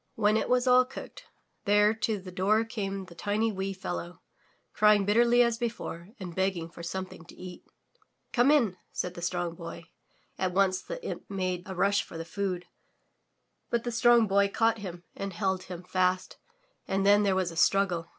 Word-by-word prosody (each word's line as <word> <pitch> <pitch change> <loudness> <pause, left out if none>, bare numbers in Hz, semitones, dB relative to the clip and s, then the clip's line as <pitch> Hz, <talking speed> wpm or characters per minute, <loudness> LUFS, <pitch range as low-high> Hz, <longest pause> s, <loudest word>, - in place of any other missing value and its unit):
When 210 -1 +3
it 220 - 0
was 250 0 +3
all 250 0 +6
cooked, 260 +1 -10 0.4
there 210 +1 +4
to 220 -1 -1
the 185 -1 -9
door 205 +5 +2
came 195 -4 -4
the 180 - -13
tiny 210 +5 0
wee 195 -1 -3
fellow, 85 - -6 0.5
crying 210 -2 +4
bitterly 235 +4 +5
as 235 -1 0
before 225 -7 -4
and 180 -3 -6
begging 185 -3 -1
for 170 - -11
something 185 -1 -6
to - - -14
eat. 180 -1 -10 0.7
"Come 245 +2 +4
in,*' 235 -11 +3
said 180 - -3
the 175 - -9
Strong 175 -1 -2
Boy. 170 0 -8 0.6
At 185 -1 0
once 185 -1 +2
the - - -7
imp - - -6
made 185 -2 -2
a 190 - -6
rush 200 +3 +2
for - - -10
the 165 - -5
food, 185 0 -3 1.0
but 235 -1 0
the 240 - -3
Strong 235 0 +5
Boy 200 0 +3
caught 225 +2 +1
him 175 -3 -7
and 195 -1 -5
held 190 -1 -1
him 180 -1 -8
fast 185 0 0 0.5
and 195 0 0
then 205 +1 +6
there 200 -2 +2
was 185 -2 0
struggle. 180 -4 +2
195 Hz, 180 wpm, -29 LUFS, 180-220 Hz, 1.0 s, all